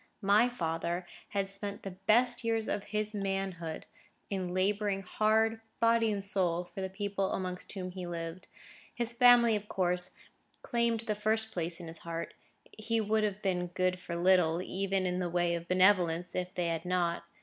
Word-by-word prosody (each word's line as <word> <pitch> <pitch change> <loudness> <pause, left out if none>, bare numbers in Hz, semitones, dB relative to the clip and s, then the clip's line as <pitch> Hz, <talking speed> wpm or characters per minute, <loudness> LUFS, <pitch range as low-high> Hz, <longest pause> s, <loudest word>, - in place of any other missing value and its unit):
My 210 +5 +5
father 170 -4 -2 0.2
had 200 -1 -1
spent 200 +1 -5
the 195 - -5
best 220 +7 +2
years 225 -1 0
of 205 - -2
his 215 +1 -2
manhood 195 -5 -3 0.5
in 185 -2 -2
labouring 195 +1 0
hard, 220 +3 +2 0.2
body 230 -1 +4
and 200 -1 -3
soul, 180 -3 0
for 185 +2 -8
the 190 - -2
people 195 0 -2
amongst 180 -1 -4
whom 185 -2 -5
he 180 -1 -6
lived. 170 +1 -5 0.5
His 235 0 -1
family, 240 -2 +6
of 210 0 -4
course, 180 -1 0 0.5
claimed 235 -1 +1
the 220 -2 -1
first 220 +1 0
place 170 -2 -2
in 175 - -8
his 165 0 -4
heart; 165 0 -5 0.4
he 225 +1 -1
would 215 0 +1
have 205 -1 -2
been 180 -2 0
good 180 +1 0
for 175 -2 -5
little, 175 -2 +4
even 190 +1 -1
in 180 0 0
the 180 -1 -1
way 175 0 +1
of 170 0 -4
benevolence, 180 -2 +3
if 180 0 -2
they 175 -2 0
had 165 -1 -2
not. 180 -2 0
190 Hz, 175 wpm, -31 LUFS, 180-215 Hz, 0.5 s, family